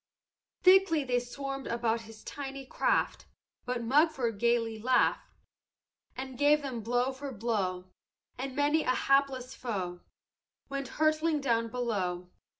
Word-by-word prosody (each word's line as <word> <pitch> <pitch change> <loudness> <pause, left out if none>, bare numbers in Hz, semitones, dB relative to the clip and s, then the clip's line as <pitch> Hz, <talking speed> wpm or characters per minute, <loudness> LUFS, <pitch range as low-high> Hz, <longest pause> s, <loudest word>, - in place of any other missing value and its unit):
"Thickly 370 -5 +6
they 250 -2 +1
swarmed 275 +2 -5
about 235 -1 0
his 220 -1 -13
tiny 275 -1 -6
craft; - - 0 0.4
But 245 -1 -2
Mugford 265 -4 +2
gayly 230 -1 +1
laughed 255 +3 +2 0.9
And 260 -1 -6
gave 295 +1 +4
them 255 -4 -4
blow 245 +4 +1
for 270 +1 -7
blow; 195 -5 -2 0.4
And 260 +1 -5
many 290 +2 +3
a 255 - +1
hapless 270 -2 +2
foe 185 -7 -4 0.7
Went 275 -1 -3
hurtling 310 0 +2
down 230 -4 +1
below. 195 -7 -2
255 Hz, 125 wpm, -30 LUFS, 230-280 Hz, 0.9 s, Thickly